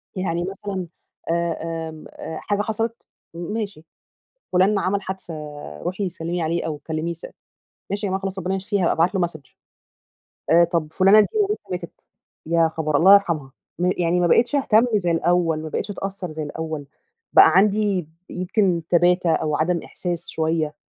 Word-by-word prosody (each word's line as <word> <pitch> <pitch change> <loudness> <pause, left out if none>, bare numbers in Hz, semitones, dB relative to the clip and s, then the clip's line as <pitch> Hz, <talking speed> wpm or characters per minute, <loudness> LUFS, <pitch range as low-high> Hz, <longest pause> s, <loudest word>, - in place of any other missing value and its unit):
يعني 175 -2 -1
مثلًا 195 -1 -5 0.4
آآ، 165 -1 -2
آمم، 155 -1 -11
آآ 160 - -7
حاجة 205 0 0
حصلت، 225 +2 -3 0.3
م 170 +4 -5
ماشي، 205 -8 -4 0.7
فلان 190 +4 +4
ما 200 - +1
عمل 195 +2 0
حادثة 190 -3 -6 0.5
روحي 190 +1 -2
سلمي 170 0 -4
عليه 165 +1 -1
أو 155 -2 -3
كلميه 160 +2 -3
س 165 - -11 0.7
"ماشي 205 +1 -2
يا - - -2
جماعة 190 +1 -1
خلاص، 195 0 -4
ربنا 190 +1 -1
يشفيه، 195 +1 -1
هابقى 170 - +3
ابعت 170 +4 +2
له 185 -2 +2
Message." 145 -6 -14 1.0
آآ، 170 +1 +7
طب 170 -2 -1
فلانة 195 +5 +6
دي 210 - +4
مامتها 415 +1 +1
ماتت، 180 -2 -7 0.4
يا 165 0 +3
خبر! 155 -2 -1
الله 190 +7 +8
يرحمها، 165 -9 +1 0.3
م 180 +1 +2
يعني 175 0 +2
ما 175 - +3
بقيتش 240 - +3
اهتم 245 -4 +4
زي 185 -5 +1
الأول، 165 -1 +1
ما 160 - -5
بقيتش 180 - -3
أتأثر 195 -3 -5
زي 155 0 -4
الأول، 155 0 -5 0.5
بقى - - +9
عندي 205 -1 +2
ب 155 - -18 0.2
يمكن 185 -1 0
تباتة 175 0 +3
أو 155 -2 0
عدم 170 +2 +1
إحساس 175 -2 -5
شوية، 160 -1 -1
175 Hz, 170 wpm, -22 LUFS, 165-195 Hz, 1.0 s, بقى